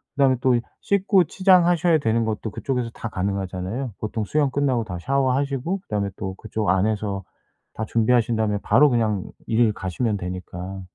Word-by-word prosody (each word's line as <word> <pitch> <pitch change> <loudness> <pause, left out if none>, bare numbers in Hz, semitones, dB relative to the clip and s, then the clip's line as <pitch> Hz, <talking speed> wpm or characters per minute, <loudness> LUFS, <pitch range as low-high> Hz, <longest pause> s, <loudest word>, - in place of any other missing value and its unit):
그다음에 135 -2 +4
또 130 -1 +4
이 120 - +1 0.2
씻고 195 -2 +3
치장하셔야 175 -2 +4
되는 115 -2 +1
것도 110 0 -3
그쪽에서 125 +1 -2
다 115 - -6
가능하잖아요. 100 +4 -3
보통 110 0 -3
수영 145 +3 +1
끝나고 130 -4 +1
다 90 -5 -6
샤워하시고 135 - 0
그다음에 105 - -2
또 95 -1 -4
그쪽 110 +1 -3
안에서 100 0 0 0.5
다 110 - -4
준비하신 115 +1 +2
다음에 110 -2 0
바로 140 +8 +5
그냥 110 -6 +1 0.2
일을 115 -1 +3
가시면 105 +3 -2
되니까. 90 +1 -6
115 Hz, 390 characters per minute, -23 LUFS, 100-135 Hz, 0.5 s, 바로